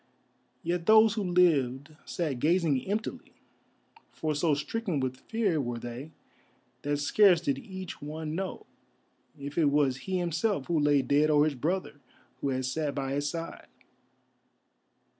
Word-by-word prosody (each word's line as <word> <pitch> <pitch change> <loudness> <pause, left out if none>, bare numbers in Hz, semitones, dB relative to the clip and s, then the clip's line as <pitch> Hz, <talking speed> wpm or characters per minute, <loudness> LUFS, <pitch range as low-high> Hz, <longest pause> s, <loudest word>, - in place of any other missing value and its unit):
Yet 170 0 -2
those 220 0 +7
who 220 - -2
lived 155 -6 +2
sat 150 -8 -2
gazing 155 -3 +2
emptily, 210 +3 -4 0.8
for 155 -1 -2
so 150 +1 +2
stricken 175 +3 -2
with 130 -1 -2
fear 205 -9 +1
were 120 -2 -3
they 120 +5 -7 0.7
that 145 +1 -1
scarce 180 +5 +5
did 275 - -1
each 190 -7 -8
one 155 +1 -5
know 190 +2 -4 0.7
if 140 +2 -4
it 160 - +4
was 140 -2 +2
he 185 +7 -3
himself 175 -1 0
who 170 -2 +1
lay 145 -2 +3
dead 145 +3 +3
or 150 -1 +5
his 155 - 0
brother 150 +2 -3 0.4
who 140 - -2
had 130 -1 -1
sat 145 +2 -2
by 135 -2 -2
his 145 +1 -1
side. 165 +2 -6
155 Hz, 145 wpm, -29 LUFS, 140-180 Hz, 0.8 s, those